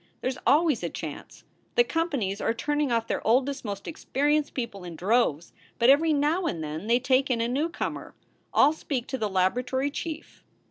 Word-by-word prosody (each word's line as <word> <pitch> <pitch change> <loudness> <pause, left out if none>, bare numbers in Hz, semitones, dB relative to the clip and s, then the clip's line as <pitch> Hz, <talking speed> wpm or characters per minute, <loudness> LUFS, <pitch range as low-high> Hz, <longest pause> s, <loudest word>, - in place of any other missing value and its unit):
"There 255 - 0
s 260 - -8
always 300 -4 +4
a - - -2
chance. - - -8 0.3
The 480 - +6
companies 280 - -1
are 225 - 0
turning 295 +2 0
off 230 -1 +1
their - - -2
oldest, 265 +4 +1
most 200 -3 -5
experienced 295 -1 0
people 235 -7 -4
in 175 -2 -7
droves, 180 -4 +1 0.2
but 235 +3 +6
every 315 +3 +4
now 305 +5 +1
and 165 -2 -3
then 155 +6 -5
they 235 +2 +4
take 260 +2 +2
in 245 -2 +1
a 230 - +1
newcomer. 290 +7 -3 0.4
I - - +6
ll - - -2
speak 275 -6 -3
to 265 - -3
the 215 - -1
laboratory 250 +9 0
chief. 320 +1 -7
255 Hz, 190 wpm, -27 LUFS, 220-295 Hz, 0.4 s, The